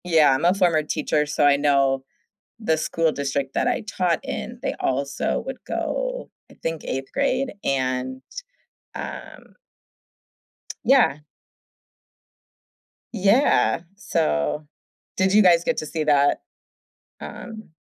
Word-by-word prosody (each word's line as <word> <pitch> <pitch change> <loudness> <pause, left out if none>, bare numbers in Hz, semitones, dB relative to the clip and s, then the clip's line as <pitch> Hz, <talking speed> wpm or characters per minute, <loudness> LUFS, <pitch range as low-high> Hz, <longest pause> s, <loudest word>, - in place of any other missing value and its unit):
Yeah, 160 -5 +5
I'm 130 - 0
a 175 - +5
former 175 -5 +2
teacher, 150 0 0
so 145 0 +1
I 140 -1 +5
know 140 -2 +2 0.6
the 160 -8 +1
school 165 +1 0
district 140 -1 -2
that - - 0
I 245 - 0
taught 185 -6 -1
in, - - -5
they - - -1
also 140 +2 -1
would 265 -1 -5
go, - - -3 0.2
I - - -17
think 165 -1 -3
8th 135 0 -4
grade 275 -1 0
and, 130 -1 -1 0.7
um - - -8 1.3
Yeah. 245 - +4 1.9
Yeah. 210 0 +3
So, 150 - -1 0.5
did 190 +1 +2
you 215 - +7
guys 170 -2 +5
get 245 - 0
to - - -2
see 155 +1 -3
that? 145 -1 +3 0.8
Um 220 -6 -9
160 Hz, 120 wpm, -23 LUFS, 140-200 Hz, 1.9 s, you